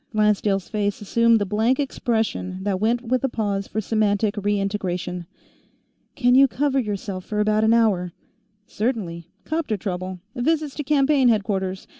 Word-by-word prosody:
Lancedale's 210 Hz, -3 st, +1 dB
face 205 Hz, -2 st, -1 dB
assumed 230 Hz, +2 st, +3 dB
the 205 Hz, -, 0 dB
blank 220 Hz, +7 st, +1 dB
expression 220 Hz, -8 st, -2 dB
that 195 Hz, -2 st, -1 dB
went 235 Hz, +4 st, +1 dB
with 255 Hz, +1 st, 0 dB
a 270 Hz, -, +1 dB
pause 200 Hz, -4 st, -2 dB
for 220 Hz, -, -3 dB
semantic 210 Hz, -1 st, +1 dB
re 205 Hz, 0 st, 0 dB
integration. 180 Hz, -3 st, -3 dB, 0.9 s
"Can 245 Hz, -2 st, +3 dB
you 270 Hz, +2 st, +7 dB
cover 275 Hz, +1 st, 0 dB
yourself 200 Hz, -4 st, -4 dB
for 210 Hz, +2 st, -3 dB
about 215 Hz, +1 st, +2 dB
an 220 Hz, -, +4 dB
hour?" 195 Hz, -6 st, +2 dB, 0.5 s
"Certainly. 200 Hz, -9 st, -3 dB, 0.2 s
'Copter 310 Hz, -9 st, -1 dB
trouble. 185 Hz, -1 st, -4 dB, 0.2 s
Visits 300 Hz, +3 st, 0 dB
to 295 Hz, -, -4 dB
campaign 280 Hz, -2 st, +3 dB
headquarters. 195 Hz, -4 st, -1 dB
215 Hz, 150 wpm, -23 LUFS, 195-245 Hz, 0.9 s, you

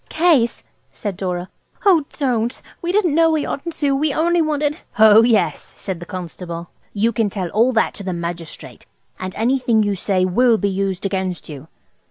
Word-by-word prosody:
"Case!" 310 Hz, -9 st, +2 dB, 0.3 s
said 205 Hz, -3 st, -5 dB
Dora. 180 Hz, -1 st, -3 dB, 0.4 s
"Oh, 345 Hz, -7 st, +5 dB
don't! 245 Hz, -4 st, -1 dB, 0.2 s
We 345 Hz, -, -1 dB
didn't 375 Hz, -6 st, +2 dB
know 330 Hz, +1 st, +4 dB
we 315 Hz, -2 st, 0 dB
oughtn't 330 Hz, +3 st, -4 dB
to. 285 Hz, -3 st, +1 dB
We 295 Hz, +2 st, +1 dB
only 340 Hz, +4 st, +2 dB
wanted–" 300 Hz, 0 st, -1 dB
"Ho, 220 Hz, 0 st, +7 dB
yes," 230 Hz, -1 st, +1 dB
said 190 Hz, -4 st, -5 dB
the 175 Hz, -, -9 dB
constable, 170 Hz, -1 st, -7 dB, 0.2 s
"you 220 Hz, +3 st, +1 dB
can 225 Hz, -2 st, 0 dB
tell 190 Hz, -3 st, -4 dB
all 230 Hz, +8 st, +3 dB
that 225 Hz, -, +1 dB
to 200 Hz, -, -8 dB
the 185 Hz, -, -3 dB
magistrate; 170 Hz, -1 st, -7 dB, 0.3 s
and 185 Hz, 0 st, -5 dB
anything 240 Hz, -1 st, +2 dB
you 205 Hz, -1 st, 0 dB
say 185 Hz, -1 st, 0 dB
will 230 Hz, +5 st, +3 dB
be 200 Hz, -1 st, 0 dB
used 195 Hz, -1 st, -2 dB
against 190 Hz, -3 st, -3 dB
you." 145 Hz, 0 st, -9 dB
220 Hz, 180 wpm, -20 LUFS, 185-285 Hz, 0.4 s, Ho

